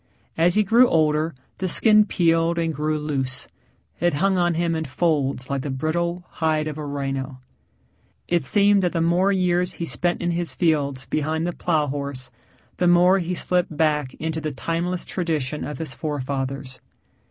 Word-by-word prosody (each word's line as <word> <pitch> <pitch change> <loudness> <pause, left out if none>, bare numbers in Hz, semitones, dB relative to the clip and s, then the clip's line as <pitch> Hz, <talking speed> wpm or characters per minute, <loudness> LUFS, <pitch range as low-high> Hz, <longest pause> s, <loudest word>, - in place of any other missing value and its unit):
As 170 +2 +3
he 215 - +4
grew 235 +5 +5
older 155 0 +1 0.2
the 190 - -1
skin 215 +2 +5
peeled 165 -1 +2
and 165 -1 0
grew 155 +1 -1
loose. 135 -4 -3 0.5
It 175 -3 +1
hung 195 +5 +2
on 175 -2 +1
him 170 0 0
in 160 0 -2
folds 140 -3 0
like 140 -1 -2
the 145 - -5
brittle 170 +6 -2
hide 155 -2 -1
of 155 0 -5
a 150 - -5
rhino. 135 -2 -4 0.9
It 175 -3 +1
seemed 200 +7 +4
that 180 -2 0
the 170 - 0
more 175 +4 +3
years 180 -1 +1
he 170 - -4
spent 165 +6 -1
in 175 0 -1
his 170 0 -2
fields 140 -6 0
behind 155 +2 -1
the 175 - -2
plow 160 -4 0
horse, 140 -2 -5 0.5
the 180 - +2
more 180 +2 +5
he 180 0 -2
slipped 175 -3 0
back 150 -4 +1
into 160 +1 -3
the 155 - -2
timeless 170 +5 -3
tradition 155 -5 -2
of 150 - -5
his 160 -1 -4
forefathers. 135 -3 -4
160 Hz, 175 wpm, -23 LUFS, 145-175 Hz, 0.9 s, grew